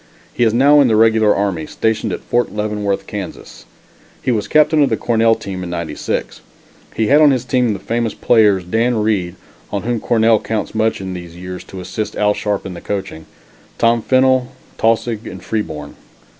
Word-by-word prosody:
He 120 - 0
is 115 - +4
now 140 +5 +5
in 135 - +4
the 110 - +2
regular 110 -1 +4
army, 95 -6 -1
stationed 110 -1 -1
at - - -4
Fort 120 0 0
Leavenworth, 105 -1 -2
Kansas. 100 -4 -8 0.5
He - - -1
was 110 -3 -1
captain 155 0 +4
of 140 - +3
the - - 0
Cornell 115 -1 +2
team 95 -4 -6
in 90 - -6
'96. 85 -3 -4 0.5
He 110 - +1
had 145 +6 +5
on 150 - +7
his 130 -3 0
team 125 -3 +1
the - - -4
famous 115 +3 -2
players, 105 -5 +3
Dan 115 +7 0
Reed, 105 -5 0 0.4
on 100 - -3
whom 120 0 -1
Cornell 115 -1 +3
counts 110 0 -3
much 110 -2 0
in 95 -1 -5
these 85 -2 -9
years 90 +1 -7
to 95 - -9
assist 110 +3 -5
Al 105 0 +2
Sharpe 105 -1 -2
in 95 - -6
the 85 - -9
coaching; 95 -5 -5 0.5
Tom 115 0 +2
Fennel, 130 0 +2 0.3
Taussig 115 0 0
and 95 -1 -9
Freeborn. 75 -9 -4
110 Hz, 185 wpm, -17 LUFS, 95-120 Hz, 0.5 s, on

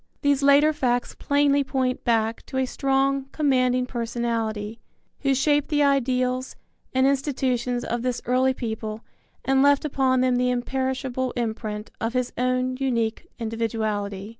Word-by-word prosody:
These 285 -1 +3
later 285 +2 +5
facts 245 -4 0
plainly 285 0 +2
point 260 -2 -1
back 225 -1 0
to 265 - -5
a 265 - +2
strong, 270 +1 0
commanding 255 -4 +2
personality, 230 -3 -3 0.4
who 275 -2 +1
shaped 290 +2 +2
the 295 -2 +2
ideals 255 -2 +1 0.4
and 260 0 +2
institutions 260 -3 0
of 240 0 -2
this 250 -1 -1
early 260 +1 +2
people 220 -2 -4 0.4
and 265 +1 +3
left 285 +1 +4
upon 265 -3 +2
them 255 -1 +2
the 250 0 +2
imperishable 260 0 -2
imprint 220 -3 -4
of 225 +1 -1
his 250 -1 -1
own 255 +1 0
unique 235 +2 -1
individuality. 220 -3 -3
255 Hz, 140 wpm, -24 LUFS, 235-270 Hz, 0.4 s, later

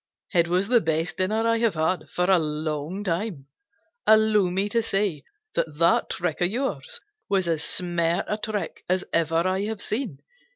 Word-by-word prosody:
"It 170 -2 +4
was 180 +3 +1
the 240 0 +4
best 160 +2 -1
dinner 215 +5 +1
I 230 0 +2
have 230 -5 +1
had 155 0 -1
for 180 - -1
a 185 0 +4
long 155 +4 -3
time. 175 -5 -2 0.6
Allow 215 -3 +5
me 190 +3 0
to 230 +2 +2
say 195 -8 0 0.3
that 155 -2 -2
that 170 +1 +3
trick 175 0 -2
of 175 - +3
yours 275 - -3 0.3
was 190 -3 +1
as 160 -2 0
smart 175 -1 0
a 210 - -2
trick 215 -1 -4
as 185 +1 +1
ever 165 +1 +2
I 190 +2 0
have 220 -1 -4
seen. 215 - -2
185 Hz, 175 wpm, -25 LUFS, 165-210 Hz, 0.6 s, Allow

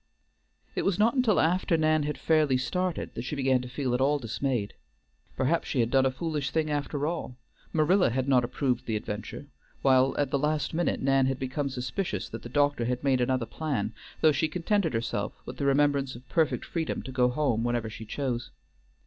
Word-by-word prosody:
It - - -1
was 195 -3 +1
not 220 +3 +4
until 250 -6 +3
after 170 +1 +2
Nan 155 0 +3
had 150 0 -2
fairly 155 -5 +3
started 180 +7 -2
that - - -4
she 130 +5 -4
began 130 -2 +2
to 125 - -8
feel 130 -1 -2
at 125 - +1
all 145 +2 +3
dismayed. 120 -3 -2 0.6
Perhaps 140 +6 +1
she 135 - -1
had 115 0 +2
done 135 -1 +4
a - - 0
foolish 150 -1 -2
thing 155 +1 0
after 145 0 -1
all; 155 -6 -3 0.3
Marilla 170 +3 +3
had 130 +2 -1
not 130 -3 +4
approved 125 0 -1
the 110 - 0
adventure, 105 +6 -5 0.4
while 130 -1 +4
at 145 -2 0
the 140 - +1
last 150 0 0
minute 170 -3 0
Nan 135 -1 +3
had 135 -1 -1
become 135 +1 -2
suspicious 125 - -3
that 115 - -7
the 120 - -9
doctor 145 -2 +2
had 125 +1 -2
made 135 -3 +2
another 130 -1 +1
plan, 115 -4 -3 0.3
though 155 - +6
she 145 +2 +1
contented 170 - 0
herself 115 +1 -2
with - - -8
the 140 - -2
remembrance 140 -1 +2
of 125 +1 -13
perfect 160 -2 +1
freedom 165 -2 -3
to 130 - -7
go 125 -1 +3
home 125 -4 0
whenever 120 -1 0
she 110 +1 -8
chose. 120 0 -3
135 Hz, 200 wpm, -28 LUFS, 125-155 Hz, 0.6 s, though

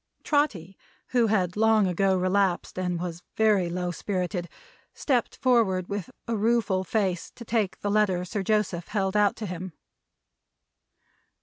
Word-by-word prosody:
Trotty, 205 - 0 0.3
who 240 -2 +3
had 185 -5 +1
long 220 -1 +4
ago 190 +1 +2
relapsed, 185 0 0
and 180 -2 -1
was 175 -1 -5 0.2
very 210 -5 +3
low 180 0 -2
spirited, 180 -1 -3 0.5
stepped 250 -5 0
forward 215 -8 +2
with 200 -3 -4 0.2
a 230 - 0
rueful 215 -3 +1
face 190 -2 -1
to 235 - -10
take 215 -4 -1
the 205 - -1
letter 195 -4 +2
Sir 200 +3 -3
Joseph 190 -4 0
held 195 -2 -1
out 205 -1 +3
to 220 - -6
him. 180 -1 -6
195 Hz, 140 wpm, -26 LUFS, 180-215 Hz, 0.5 s, long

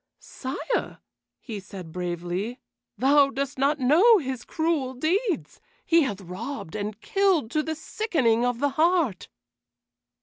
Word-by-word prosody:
"Sire," 270 - -4 0.4
he 220 -5 -6
said 185 -3 -10
bravely, 180 +6 -3 0.4
"thou 275 +2 +5
dost 275 +1 -4
not 285 +3 +2
know 340 - +6
his 260 -7 -4
cruel 315 -5 -1
deeds. 355 - -1 0.2
He 335 0 +5
hath 205 -9 -2
robbed 190 - -6
and 210 0 -4
killed 380 - +1
to 305 - +1
the 315 +1 -3
sickening 295 - 0
of 245 -1 +1
the 285 +1 +2
heart." 315 - +1
270 Hz, 130 wpm, -26 LUFS, 220-315 Hz, 0.4 s, know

